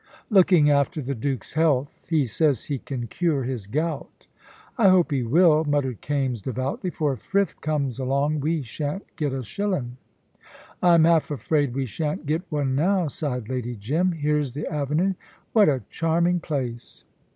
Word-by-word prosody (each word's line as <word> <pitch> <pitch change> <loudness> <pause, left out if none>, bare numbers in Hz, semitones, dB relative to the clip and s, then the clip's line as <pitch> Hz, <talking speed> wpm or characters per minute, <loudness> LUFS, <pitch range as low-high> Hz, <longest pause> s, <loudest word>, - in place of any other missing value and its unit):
"Looking 180 -6 +5
after 145 +3 +1
the 140 -1 -3
Duke's 130 -2 -3
health. 145 -3 0
He 155 -4 +2
says 135 +1 +1
he 140 -3 -3
can 125 -2 -5
cure 150 +3 0
his 120 -6 -4
gout." 150 +5 -3 0.5
"I 230 -6 +4
hope 180 -3 +4
he 135 -3 +1
will," 155 +5 +4
muttered 145 -6 -1
Kaimes, 135 -6 -1
devoutly. 130 - -3
"For 150 -5 -1
if 130 - -9
Frith 200 0 -1
comes 140 -5 -1
along 140 +3 0
we 155 +1 -1
shan't 145 - -4
get 150 -3 -1
a 130 -1 -3
shillin'!" 135 - -3 0.8
"I'm 170 -2 +5
half 165 -1 +3
afraid 145 -1 0
we 135 -1 -1
shan't 150 +6 -3
get 155 +4 0
one 145 -3 -1
now," 175 +3 +2
sighed 125 -6 -3
Lady 125 -1 -3
Jim. 155 - 0
"Here's 150 -4 0
the 150 +3 -4
avenue. 150 +6 0 0.4
What 215 -7 +6
a 135 -3 0
charming 170 +2 +1
place!" 130 -7 -5
145 Hz, 160 wpm, -24 LUFS, 130-165 Hz, 0.8 s, What